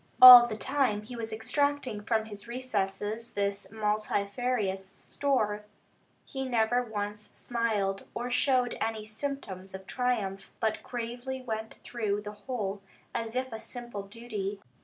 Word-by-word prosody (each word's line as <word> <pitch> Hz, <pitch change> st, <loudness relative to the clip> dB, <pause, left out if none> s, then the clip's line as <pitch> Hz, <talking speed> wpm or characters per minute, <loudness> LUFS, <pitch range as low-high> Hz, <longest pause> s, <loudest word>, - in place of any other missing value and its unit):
All 250 Hz, -1 st, +13 dB
the 215 Hz, -2 st, -4 dB
time 260 Hz, -6 st, +1 dB
he 240 Hz, +3 st, -8 dB
was 225 Hz, -1 st, -3 dB
extracting 275 Hz, 0 st, 0 dB
from 220 Hz, 0 st, 0 dB
his 205 Hz, 0 st, -9 dB
recesses 220 Hz, -2 st, -2 dB
this 200 Hz, 0 st, -1 dB
multifarious 210 Hz, 0 st, -1 dB
store, 210 Hz, +1 st, -1 dB, 0.6 s
he 265 Hz, -2 st, -4 dB
never 245 Hz, -1 st, +2 dB
once 210 Hz, -3 st, -4 dB
smiled, 215 Hz, -5 st, -1 dB
or 245 Hz, +1 st, -3 dB
showed 250 Hz, -1 st, +2 dB
any 220 Hz, -1 st, -1 dB
symptoms 215 Hz, -6 st, -5 dB
of 190 Hz, 0 st, -9 dB
triumph, 220 Hz, -7 st, -1 dB
but 220 Hz, -1 st, 0 dB
gravely 245 Hz, +2 st, -5 dB
went 220 Hz, -2 st, -4 dB
through 210 Hz, -4 st, -1 dB
the 210 Hz, 0 st, -6 dB
whole, 205 Hz, -2 st, -4 dB, 0.3 s
as 230 Hz, 0 st, -3 dB
if 255 Hz, -1 st, -2 dB
a 220 Hz, -, -4 dB
simple 240 Hz, -3 st, -6 dB
duty. 205 Hz, -1 st, -5 dB
220 Hz, 135 wpm, -30 LUFS, 205-245 Hz, 0.6 s, All